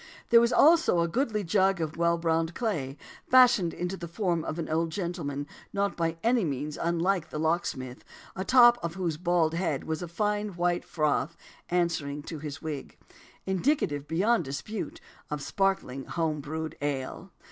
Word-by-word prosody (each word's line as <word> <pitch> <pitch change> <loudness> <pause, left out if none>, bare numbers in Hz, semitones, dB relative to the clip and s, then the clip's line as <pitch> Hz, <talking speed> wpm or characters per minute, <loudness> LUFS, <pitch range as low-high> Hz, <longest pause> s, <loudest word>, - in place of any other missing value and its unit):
There 235 0 +8
was 235 +1 +2
also 315 - +5
a 170 - +1
goodly 215 - -1
jug 190 +1 +2
of 155 -1 -3
well 170 0 +2
browned 165 0 0
clay, 150 - -2 0.3
fashioned 245 -9 +6
into 180 +3 -3
the 175 -2 -7
form 170 -2 -1
of 155 - -4
an 165 - -3
old 165 +1 0
gentleman 160 -5 -3 0.3
not 200 0 0
by 165 -1 -1
any 235 -1 +3
means 150 -1 -3
unlike 170 +1 0
the - - -5
locksmith, 150 -6 -2 0.3
atop 240 +5 +6
of 170 0 -3
whose 175 -5 -2
bald 170 -2 +1
head 165 -5 -1
was 160 +1 -3
a 175 - -4
fine 210 +3 -1
white 175 0 0
froth 155 0 0 0.3
answering 160 -5 -1
to 160 0 -7
his 150 +1 -7
wig, 150 -3 -6 0.5
indicative, 190 - 0
beyond 195 +6 +2
dispute, 145 +10 -5 0.3
of 150 -2 -4
sparkling 190 -10 -1
home 160 -3 -1
brewed 160 +2 -5
ale. 145 +5 -3
170 Hz, 160 wpm, -28 LUFS, 155-195 Hz, 0.5 s, There